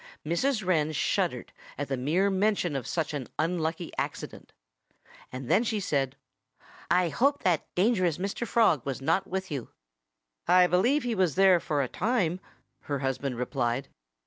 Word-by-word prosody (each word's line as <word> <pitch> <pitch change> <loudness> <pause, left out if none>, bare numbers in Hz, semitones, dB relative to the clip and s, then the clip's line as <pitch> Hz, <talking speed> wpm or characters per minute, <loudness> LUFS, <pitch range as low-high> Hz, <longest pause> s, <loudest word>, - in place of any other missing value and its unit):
Mrs. 215 - 0
Wren 155 -4 +2
shuddered - - -1 0.2
at 145 - -3
the 135 - -1
mere 165 +10 +1
mention 190 -5 +1
of 130 -4 -3
such 160 -3 -2
an 140 -4 -4
unlucky 165 0 -1
accident. - - -5 0.8
And 130 0 -6
then 215 - +3
she 225 -3 -1
said: 140 -7 -1 0.7
"I 175 0 +3
hope 280 - +1
that 175 -5 +1
dangerous 185 -5 +2
Mr. 200 +5 -3
Frog 205 - +3
was 135 -2 -3
not 165 +8 +1
with 190 -1 -4
you." 135 -5 -4 0.8
"I 180 0 +6
believe 230 - +2
he 245 -1 -1
was 185 -7 +1
there 190 -2 +6
for 145 -3 -1
a - - -2
time," 185 - 0 0.5
her 145 - -1
husband 135 -1 -2
replied. 125 +1 -2
175 Hz, 155 wpm, -28 LUFS, 140-195 Hz, 0.8 s, I